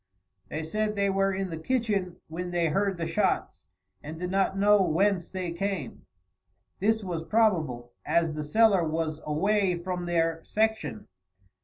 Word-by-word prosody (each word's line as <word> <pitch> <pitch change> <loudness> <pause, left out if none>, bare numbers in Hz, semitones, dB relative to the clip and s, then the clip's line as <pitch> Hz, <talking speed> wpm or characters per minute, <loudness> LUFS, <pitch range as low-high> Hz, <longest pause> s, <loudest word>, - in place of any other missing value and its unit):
They 155 - -3
said 210 +6 -1
they 200 -1 +1
were 195 0 +2
in 190 -1 -3
the 160 - -5
kitchen 205 -4 -1
when 175 +3 -5
they 170 -2 +1
heard 195 +3 0
the 165 - -2
shots, - - -1 0.3
and 155 +2 -7
did 180 +1 -3
not 195 0 +1
know 205 0 +5
whence 185 +1 +1
they 185 -2 -4
came. 175 - -4 0.7
This 220 +2 +2
was 170 -4 -3
probable, 160 - +1
as 165 -2 +1
the 150 - -4
cellar 200 +3 +4
was 160 -1 -2
away 190 +4 +1
from 180 0 -4
their 165 -1 0
section. 220 -1 -1
180 Hz, 155 wpm, -28 LUFS, 165-200 Hz, 0.7 s, know